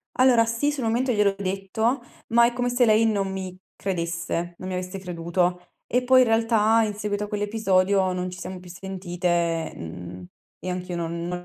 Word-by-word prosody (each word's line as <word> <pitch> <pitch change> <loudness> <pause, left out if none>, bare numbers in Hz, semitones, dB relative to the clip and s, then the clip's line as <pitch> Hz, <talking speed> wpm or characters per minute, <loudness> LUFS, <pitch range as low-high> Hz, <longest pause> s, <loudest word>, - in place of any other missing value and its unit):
Allora 250 -3 +5
sì, 230 +6 0
sul 275 -4 -3
momento 240 +3 +1
gliel'ho 205 -2 +3
detto, 200 +6 -1 0.3
ma 235 +1 +5
è 235 - +2
come 245 0 -1
se 245 0 +3
lei 220 0 +4
non 200 -3 0
mi 185 -1 -5 0.2
credesse 170 -1 -3
non 185 - -7
mi 185 - -3
avesse 185 +1 -4
creduto, 180 0 -1 0.3
e 250 +1 +1
poi 255 +1 +6
in 250 - +4
realtà, 225 0 +3
in 210 -1 -1
seguito 205 0 -2
a - - -4
quell'episodio, 200 -3 +1
non 180 0 -2
ci 180 - -9
siamo 185 0 -6
più 180 0 -13
sentite, 175 -3 -2
mhmm, 90 +2 -8 0.3
e 185 - -5
anch'io 180 -1 -4
non 170 0 -3
non 180 0 -2
195 Hz, 190 wpm, -25 LUFS, 180-225 Hz, 0.3 s, poi